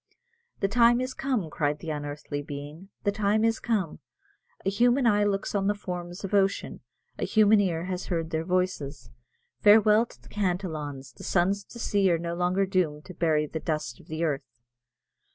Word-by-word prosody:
"The 195 - +3
time 235 +3 +5
is 255 0 -2
come," 255 -10 -1
cried 150 -1 0
the 160 +1 -5
unearthly 145 0 -4
being, 145 +6 -8
"the 205 - +2
time 210 +1 +1
is 225 0 +1
come; 205 -9 -1 0.7
a - - +3
human 245 +5 +3
eye 210 -2 +4
looks 200 -1 -1
on 195 -1 +1
the 205 - +2
forms 180 -2 -6
of 195 - -5
ocean, 195 -1 +1 0.4
a - - -1
human 215 -1 +5
ear 170 -4 0
has 185 0 -4
heard 165 -2 -2
their 160 0 -1
voices. 180 -6 -2 0.5
Farewell 215 +2 +6
to - - -17
the - - -19
Cantillons; 160 - -3
the - - -12
sons 195 +3 +1
of - - -52
the - - -9
sea 200 -4 +2
are 170 - +3
no 170 +1 -4
longer 180 +3 +1
doomed 175 -6 0
to 185 - -9
bury 160 -3 +1
the 160 +2 -5
dust 155 -7 -3
of - - -18
the 160 +1 -3
earth!" 135 -6 -3
185 Hz, 190 wpm, -27 LUFS, 155-205 Hz, 0.7 s, Farewell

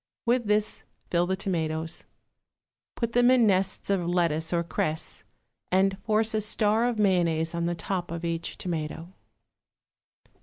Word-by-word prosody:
With 240 0 +2
this 210 +1 +1 0.3
fill 175 0 +2
the 190 - +1
tomatoes, 160 -4 -2 0.9
put 235 -1 -2
them 245 +1 +4
in 255 -2 +5
nests 190 -1 +1
of 190 -3 +1
lettuce 165 -3 +1
or 170 -1 +1
cress, 160 -1 -3 0.5
and 190 +1 +3
force 220 +1 +1
a 215 - +1
star 215 +2 +2
of 240 - -3
mayonnaise 170 -5 +2
on 170 0 -1
the 175 - -1
top 180 +1 -3
of 170 +1 -4
each 165 0 -3
tomato. 165 0 -4
185 Hz, 145 wpm, -27 LUFS, 170-215 Hz, 0.9 s, in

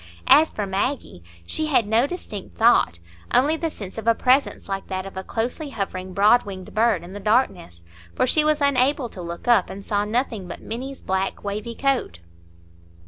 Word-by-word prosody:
As 315 +2 +6
for 210 - -4
Maggie, 195 - -2 0.2
she 310 - -1
had 265 -7 +3
no 225 +5 +3
distinct 220 - -7
thought, 225 - +4 0.4
only 290 +5 +4
the 325 0 -2
sense 200 -7 -7
of 225 - -8
a 230 - +5
presence 260 +4 +1
like 195 -1 -4
that 185 0 -4
of 195 - -9
a 190 - -5
closely 245 - -3
hovering 190 -6 -4
broad 210 +6 +5
winged 190 -2 -9
bird 215 -5 +2
in 175 +2 -10
the 205 - -6
darkness, 195 - 0 0.3
for - - +2
she 305 +4 +3
was 305 -1 +1
unable 275 -1 +2
to 185 - -9
look 170 +3 -7
up, 235 -6 +4
and 195 +1 -8
saw 205 -1 0
nothing 220 -3 -2
but - - -7
Minny's 260 +4 -6
black 190 +1 -2
wavy 210 +3 -4
coat. 270 - 0
220 Hz, 190 wpm, -23 LUFS, 190-260 Hz, 0.4 s, As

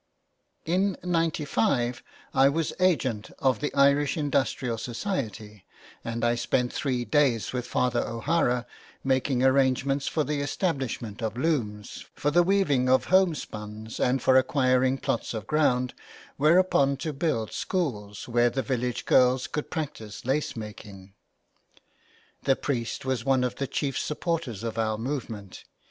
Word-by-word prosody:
In 185 +3 +1
'95 150 -8 0 0.3
I 135 +1 +5
was 160 +2 -1
agent 130 - +1
of 130 -4 +1
the 150 - -2
Irish 140 +1 +3
Industrial 135 -5 0
Society 115 - -4 0.4
and 115 0 -2
I 120 - +3
spent 120 +1 0
three 125 -4 -1
days 120 -4 +2
with 125 -1 -3
Father 125 -1 +1
O'Hara 125 0 0 0.4
making 130 -1 +1
arrangements 135 +1 +2
for 155 - 0
the 145 -1 -2
establishment 135 - -2
of 110 +1 -3
looms, 120 -9 -2
for 145 - 0
the 175 +3 +5
weaving 170 -9 +2
of 130 0 +4
home 185 -3 +5
spuns 110 -3 -7
and 125 0 +1
for 130 - +5
acquiring 130 0 +3
plots 115 -2 -2
of 110 -2 -5
ground 125 -3 +1 0.5
whereon 150 -3 +4
to 155 +2 -4
build 135 -7 -1
schools 105 - -3
where 120 0 +3
the 135 +2 -2
village, 125 -2 -2
girls 125 +1 +4
could 150 +1 -4
practice 135 - -5
lace 140 +4 0
making. 105 -3 -9 1.3
The 135 - +3
priest 125 -3 -3
was 130 -3 -1
one 135 -2 +2
of 125 - -2
the 135 - -2
chief 135 0 -2
supporters 150 - -3
of 115 -1 -3
our 110 -1 0
movement. 115 -6 -5
130 Hz, 140 wpm, -27 LUFS, 115-145 Hz, 1.3 s, I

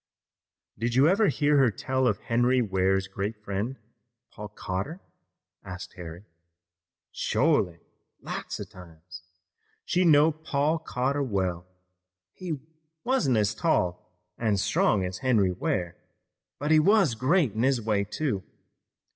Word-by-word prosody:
"Did 115 +1 -1
you 135 +4 +5
ever 200 +5 +4
hear 145 -3 +2
her 130 -3 +5
tell 130 +4 -1
of 105 - +1
Henry 120 +2 +2
Ware's 95 -3 +1
great 100 +3 -4
friend, 105 +6 -3 0.5
Paul 105 - -8
Cotter?" 105 - -5 0.6
asked 95 -1 -8
Harry. 85 +1 -9 0.9
"Shorely; 105 - +1 0.4
lots - - -6
of - - -8
times. 90 0 -13 0.6
She 180 - +1
knowed 155 -1 +4
Paul 150 +2 +1
Cotter 140 -2 -1
well. 95 -8 -2 0.7
He 170 -6 -5 0.4
wuzn't 160 - +2
as 105 0 +2
tall 90 -4 -1 0.3
an' 110 -3 +1
strong 95 0 +2
as 90 +1 -5
Henry 110 -8 +2
Ware, 90 -1 -2 0.6
but 145 +3 -2
he 155 - +7
was 195 - +4
great 130 - +2
in 110 - -2
his 130 0 +2
way, 105 -2 0
too. 105 -2 -2
115 Hz, 130 wpm, -27 LUFS, 95-145 Hz, 0.9 s, he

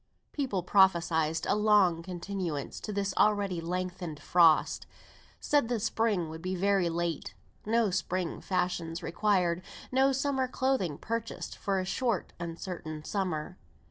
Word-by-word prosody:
People 250 -11 -2
prophesied 170 -4 +3
a - - +3
long 205 -5 +4
continuance 175 -4 -4
to 215 - -5
this 200 -1 -1
already 200 -4 +2
lengthened 175 -2 -4
frost; 165 -3 +4 0.5
said 290 -5 +2
the 240 -2 0
spring 215 -4 0
would 160 +1 -8
be 185 +2 -2
very 195 -1 +2
late; 170 0 -3 0.3
no 225 -2 +2
spring 180 -2 -2
fashions 175 -2 -2
required; 180 -1 +1 0.3
no 265 +1 +4
summer 270 -1 0
clothing 255 - 0
purchased 230 0 -4
for 195 -2 -1
a 185 - -2
short 230 +1 -1
uncertain 165 -2 -6
summer. 180 -2 -3
185 Hz, 130 wpm, -30 LUFS, 170-210 Hz, 0.5 s, long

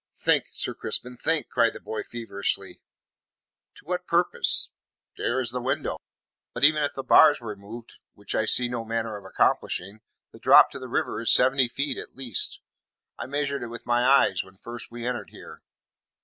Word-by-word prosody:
"Think, - - +2
Sir - - -2
Crispin, 125 0 -3
think," 160 +5 -1
cried 115 - +2
the - - -9
boy 110 - -5
feverishly. 100 -5 -4 0.9
"To - - -17
what 180 +1 -3
purpose? 170 +1 +2 0.4
There 125 +2 -1
is 120 -2 -1
the 125 0 -4
window. 130 +2 -2 0.6
But - - -4
even 155 +1 +5
if 145 -1 -1
the 135 - -5
bars 150 +2 +6
were 110 -3 -6
moved, 110 +4 -12 0.2
which 100 - -6
I 110 - +1
see 125 +2 +3
no 120 -1 -4
manner 115 -1 -3
of 100 - -10
accomplishing, 100 +4 -1 0.3
the - - -15
drop - - +7
to 140 - -8
the 130 - -8
river 115 -2 -2
is 115 - +2
seventy 130 0 +4
feet 135 +2 -3
at - - -10
least. 125 -6 -2 0.6
I - - -5
measured 140 0 -2
it 120 - -5
with 120 0 -9
my 120 0 +2
eyes 135 +1 +4
when 95 0 -19
first 120 +4 -9
we 120 0 -8
entered 125 - -3
here. - - -13
120 Hz, 185 wpm, -25 LUFS, 115-135 Hz, 0.9 s, drop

